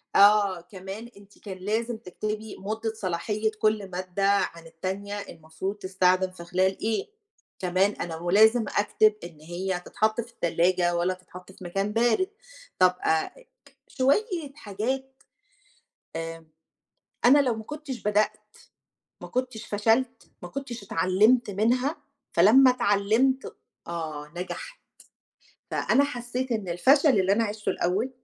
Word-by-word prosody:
آه، 200 Hz, -3 st, +5 dB
كمان 195 Hz, +5 st, -9 dB
أنتِ 200 Hz, 0 st, -18 dB
كان 190 Hz, -3 st, -8 dB
لازم 220 Hz, +5 st, -2 dB
تكتبي 215 Hz, +1 st, -5 dB
مُدة 220 Hz, +3 st, -3 dB
صلاحية 210 Hz, +3 st, -1 dB
كل 215 Hz, -3 st, +1 dB
مادة 185 Hz, +2 st, -2 dB
عن 170 Hz, -4 st, 0 dB
التانية 190 Hz, +5 st, -5 dB
المفروض 160 Hz, +2 st, -6 dB
تستخدم 185 Hz, -1 st, +1 dB
في 170 Hz, -2 st, -11 dB
خلال 185 Hz, +2 st, +1 dB
إيه، 220 Hz, -, -1 dB, 0.5 s
كمان 185 Hz, +2 st, +2 dB
أنا 165 Hz, -5 st, -5 dB
ولازم 215 Hz, +7 st, +4 dB
أكتب 210 Hz, +1 st, +4 dB
إن 165 Hz, -3 st, -10 dB
هي 180 Hz, +3 st, -3 dB
تتحط 220 Hz, +2 st, 0 dB
في 235 Hz, +1 st, -12 dB
التلاجة 175 Hz, -1 st, +1 dB
والّا 175 Hz, +2 st, +1 dB
تتحط 180 Hz, 0 st, -13 dB
في 185 Hz, -, -14 dB
مكان 195 Hz, +4 st, -2 dB
بارد. 240 Hz, -, +2 dB, 0.5 s
طب 185 Hz, 0 st, +5 dB
أ 160 Hz, 0 st, +2 dB, 0.4 s
ك 275 Hz, -1 st, -22 dB
شوية 300 Hz, -, 0 dB
حاجات، 260 Hz, +5 st, -4 dB, 0.9 s
آآ 165 Hz, 0 st, -6 dB, 0.8 s
أنا 270 Hz, +4 st, +7 dB
لو 255 Hz, -5 st, +2 dB
ما 220 Hz, -, -7 dB
كنتش 300 Hz, -2 st, -7 dB
بدأت 210 Hz, +1 st, +2 dB, 0.9 s
ما -, -, -7 dB
كنتش 250 Hz, -3 st, -3 dB
فشلت 230 Hz, +4 st, 0 dB
ما 175 Hz, -, -6 dB
كنتش 245 Hz, -3 st, -6 dB
اتعلمت 205 Hz, +6 st, +3 dB
منها 250 Hz, -, +1 dB, 0.4 s
فلمّا 245 Hz, +9 st, +7 dB
اتعلمت 240 Hz, +4 st, +1 dB, 0.3 s
آه 155 Hz, -3 st, -5 dB
نجحت. -, -, -6 dB, 0.9 s
فأنا 280 Hz, -, +3 dB
حسيت 250 Hz, -1 st, -3 dB
إن 210 Hz, -5 st, -2 dB
الفشل 270 Hz, -, +4 dB
اللي 190 Hz, +1 st, +2 dB
أنا 230 Hz, +2 st, +2 dB
عيشته 210 Hz, 0 st, -3 dB
الأول 195 Hz, +9 st, 0 dB
205 Hz, 130 wpm, -26 LUFS, 185-235 Hz, 0.9 s, أنا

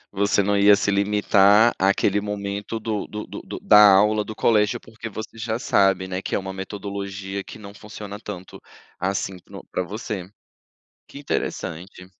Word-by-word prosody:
Você 100 Hz, +1 st, +2 dB
não 100 Hz, +1 st, +1 dB
ia 100 Hz, 0 st, +6 dB
se 100 Hz, 0 st, 0 dB
limitar 105 Hz, +2 st, +4 dB
àquele 100 Hz, +1 st, +2 dB
momento 105 Hz, +1 st, -4 dB
do 110 Hz, -2 st, -3 dB
do 105 Hz, 0 st, -6 dB
do -, -, -8 dB
do -, -, -8 dB
da 105 Hz, 0 st, +7 dB
aula 105 Hz, +2 st, +4 dB
do 110 Hz, +1 st, -8 dB
colégio, 110 Hz, +1 st, +2 dB
porque 110 Hz, 0 st, -9 dB
você 110 Hz, +1 st, -8 dB
já 110 Hz, 0 st, -2 dB
sabe, 95 Hz, -5 st, +2 dB
né, 95 Hz, 0 st, -4 dB
que -, -, -3 dB
é -, -, +2 dB
uma 95 Hz, 0 st, -6 dB
metodologia 100 Hz, 0 st, -6 dB
que -, -, -11 dB
não 100 Hz, -2 st, -11 dB
funciona 105 Hz, -1 st, -9 dB
tanto 95 Hz, -4 st, -9 dB, 0.4 s
assim, 95 Hz, 0 st, -2 dB
no -, -, -10 dB
para -, -, -1 dB
você. 95 Hz, -1 st, -5 dB, 0.8 s
Que -, -, -10 dB
interessante. 90 Hz, -, -4 dB
100 Hz, 165 wpm, -23 LUFS, 95-105 Hz, 0.8 s, da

